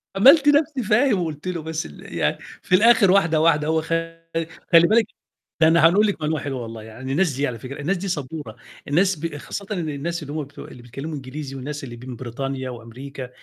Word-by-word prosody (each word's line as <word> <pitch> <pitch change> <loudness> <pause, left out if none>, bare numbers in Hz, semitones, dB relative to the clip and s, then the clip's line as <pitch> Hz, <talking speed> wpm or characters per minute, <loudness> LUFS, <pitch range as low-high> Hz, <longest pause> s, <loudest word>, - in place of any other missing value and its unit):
عملت 275 +8 +7
نفسي 290 -2 +3
فاهم 215 +1 +3
وقلت 160 -1 -4
له، 175 -3 -2
بس 160 0 -4
ال 75 - -11
يعني - - +1 0.2
في 180 - +2
الآخر 215 -1 +6
واحدة، 170 -5 +3
واحدة 155 -2 +3
هو 160 0 +2
خ 165 - -11 0.9
خلي 170 0 +8
بالِك 225 0 +4 0.6
ده 160 - +7
أنا 165 0 +6
هنقول 205 +5 +4
لِك 200 -6 -2
معلومة 155 0 0
حلوة 135 -2 -4
والله 115 -1 -8
عن 130 +4 -8
الناس 160 +2 +1
دي 140 +3 0
على 115 -3 -5
فكرة، 130 +4 -8
الناس 185 +7 0
دي 195 +3 -5
صبورة، 145 - -4 0.3
الناس 185 +6 +3
ب 160 -2 -4
خاصةً 200 +7 -6
إن 175 -6 -2
الناس 160 +4 -3
اللي 145 0 -7
هُم 155 -1 -2
بتوع 140 +1 -11
اللي 125 - -12
بيتكلموا 135 +6 -6
إنجليزي 135 +1 -7
والناس 145 +2 -6
اللي 120 -3 -7
من 125 +1 -8
بريطانيا 130 +2 -4
وأمريكا، 125 +3 -8
155 Hz, 210 wpm, -23 LUFS, 135-180 Hz, 0.9 s, خلي